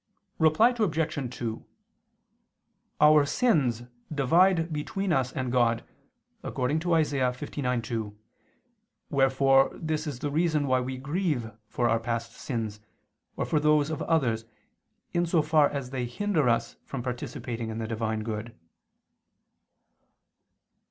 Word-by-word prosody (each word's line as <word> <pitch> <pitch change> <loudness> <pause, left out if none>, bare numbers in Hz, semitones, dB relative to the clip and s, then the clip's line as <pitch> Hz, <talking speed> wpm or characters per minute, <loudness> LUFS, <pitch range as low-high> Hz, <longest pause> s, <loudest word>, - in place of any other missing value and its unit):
Reply 160 +11 +5
Obj. 155 - -1
2: 115 -2 -4 1.4
Our 150 0 +7
sins 140 - +1 0.3
divide 165 +4 +3
between 180 +5 -2
us 130 -1 +1
and 130 -2 -3
God, 120 -2 +2 0.6
according 130 +5 -1
to 170 0 +2
Isa. 150 -3 +1
59:2; 125 -4 -2 1.0
wherefore 135 -1 +4
this 155 -1 -3
is 140 -4 -4
the 145 +3 -3
reason 155 -1 +1
why 130 -1 +2
we 130 +1 -4
grieve 140 -4 -2 0.2
for 120 +2 0
our 115 0 +2
past 115 0 -3
sins, 110 -6 -4 0.6
or - - -1
for 155 - +1
those 150 0 +3
of 155 - -3
others, 120 -9 +1 0.7
in 175 0 +1
so 165 -2 +2
far 150 -1 +4
as 140 -3 -5
they 125 -2 -2
hinder 155 0 0
us 115 0 0
from 135 -3 -6
participating 120 -2 -4
in 110 - -5
the 110 -1 -3
Divine 110 -1 -2
good. 110 +1 -5
135 Hz, 125 wpm, -27 LUFS, 120-155 Hz, 1.4 s, Our